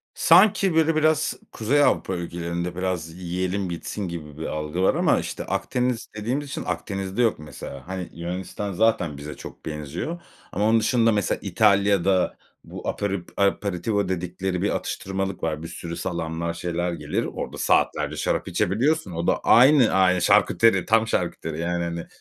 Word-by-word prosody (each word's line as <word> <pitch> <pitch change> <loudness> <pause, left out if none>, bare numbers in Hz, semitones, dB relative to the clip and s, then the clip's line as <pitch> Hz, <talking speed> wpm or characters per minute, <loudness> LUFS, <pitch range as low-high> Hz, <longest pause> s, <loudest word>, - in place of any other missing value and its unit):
Sanki, 185 0 +5
böyle, 160 0 +3
biraz 155 -1 +2 0.2
Kuzey 140 +7 +2
Avrupa 95 -8 +1
ülkelerinde, 85 0 -4
biraz 90 -3 -2
yiyelim 90 +2 -2
bitsin 95 +3 -4
gibi 75 -4 -7
bir 80 - -5
algı 75 +3 -3
var 95 - +3
ama, - - +3
işte, - - -5
Akdeniz 125 -2 -1
dediğimiz 125 +7 -2
için - - -4
Akdeniz'de 95 +2 -3
yok, 115 -8 +2
mesela. 75 -1 -9
Hani, 95 -1 -5
Yunanistan 90 +4 -5
zaten 95 -7 +1
bize 75 +1 -7
çok - - -11
benziyor 80 - -5 0.3
ama 100 +3 0
onun 115 +1 +4
dışında, 115 0 +3
mesela, 105 -3 0
İtalya'da 100 -2 +2 0.3
bu - - -8
aperet 100 -3 -3
aperitivo 100 0 0
dedikleri 90 0 -2
bir 100 - +1
atıştırmalık 95 -1 -3
var. 80 -1 -2
Bir - - -5
sürü 85 0 -6
salamlar, 85 -1 -3
şeyler 85 0 -2
gelir. - - -2
Orada - - -5
saatlerce - - +1
şarap - - -1
içebiliyorsun. 135 - +1
O 85 0 -3
da - - +2
aynı 130 0 +6
ay 90 -1 +3
şarküteri, 95 +2 +4
tam 110 +1 +3
şarküteri, 85 -5 -2
yani, 85 +1 -1
hani, 85 0 -4
95 Hz, 155 wpm, -24 LUFS, 85-110 Hz, 0.3 s, aynı